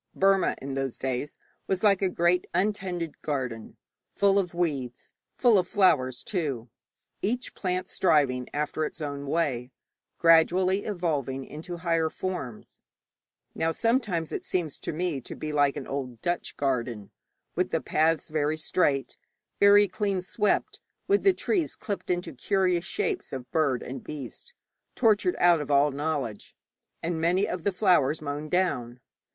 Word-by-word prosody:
Burma 195 0 +3
in 135 0 -5
those 135 -2 -2
days 130 +3 -3 0.3
was 190 0 -1
like 200 -2 +4
a 190 - +2
great 175 +1 +2
untended 185 -5 -1
garden, 125 -7 -4 0.4
full 200 0 +4
of 180 -3 -1
weeds, 140 -8 -2 0.3
full 235 -5 +5
of 180 - -1
flowers 135 - +2
too, 135 - -3 0.5
each 245 +5 -2
plant 185 -1 -2
striving 135 -10 +2
after 150 +1 -2
its 155 - -4
own 145 -2 -4
way, 135 -6 0 0.5
gradually 180 +4 +4
evolving 145 - -2
into 165 +4 -7
higher 165 -1 +1
forms. 150 -12 -6 0.7
Now 165 0 0
sometimes 210 - 0
it - - -3
seems 165 -6 -2
to - - -4
me 165 -3 -2
to - - -7
be 155 - -5
like 145 -2 +2
an 140 - -5
old 130 -4 -5
Dutch 175 0 -2
garden, 120 -6 -2 0.4
with - - 0
the - - 0
paths 160 +1 +1
very 155 0 0
straight, 145 -4 0 0.4
very 205 0 +7
clean 195 -2 -1
swept, 210 +3 0 0.3
with 405 +1 +3
the 390 - +6
trees 360 -3 -1
clipped 200 -2 -5
into 175 -2 -1
curious 180 +4 +1
shapes 420 -3 -2
of 130 -2 -7
bird 140 -6 +1
and 130 0 -7
beast, 150 - -8 0.4
tortured 225 - +3
out 175 -3 +5
of 150 - -6
all 145 +1 +4
knowledge, 140 -6 -3 0.5
and 165 -1 -2
many 180 +4 +2
of 180 -2 -4
the 200 - +2
flowers 180 -7 +3
mown 150 +1 -5
down. 140 -9 0
165 Hz, 150 wpm, -27 LUFS, 140-185 Hz, 0.7 s, very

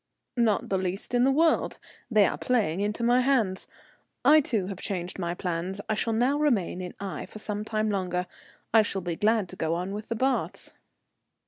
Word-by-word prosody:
"Not 225 -4 +2
the 190 - +1
least 190 +5 -3
in 245 0 +4
the 270 - +4
world, 320 +3 +2 0.3
they 215 -4 +5
are - - 0
playing 210 -9 0
into 210 +3 -1
my 245 +2 +4
hands. 235 -8 +1 0.6
I, 310 +1 +8
too, 220 -9 -1
have 190 -1 -6
changed 180 -1 -3
my 175 -1 -2
plans. 180 +2 -3
I - - +1
shall 220 +2 0
now 250 +6 +2
remain 220 - +1
in 180 -1 -7
Aix 195 -2 -6
for - - -9
some 210 0 -3
time 215 0 -1
longer. 180 -2 -1 0.5
I 225 - +8
shall 195 -2 -2
be 175 -2 -3
glad 215 +1 +2
to - - -8
go 160 +1 -1
on 180 +3 -3
with 210 +1 -6
the 230 - -1
baths." 265 +4 -1
210 Hz, 200 wpm, -27 LUFS, 185-235 Hz, 0.6 s, I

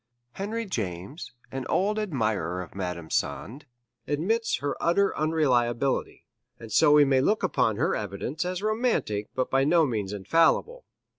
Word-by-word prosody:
Henry 220 - -4
James, 105 - -5 0.2
an 130 0 -5
old 210 +3 +1
admirer 110 - -1
of 90 -3 -8
Madame 90 -4 -5
Sand, 115 - -3 0.4
admits 215 +11 0
her 145 +2 -3
utter 195 +4 +2
unreliability, 135 -5 0 0.3
and 115 -1 -10
so 145 - +5
we 150 -1 +7
may 135 -1 +3
look 210 +10 +1
upon 125 - +1
her - - 0
evidence 105 - -4
as 180 +2 -4
romantic 215 - 0
but 130 - -1
by 135 0 +3
no 165 +3 +4
means 105 -7 -2
infallible. 165 - +1
135 Hz, 145 wpm, -26 LUFS, -, 0.4 s, we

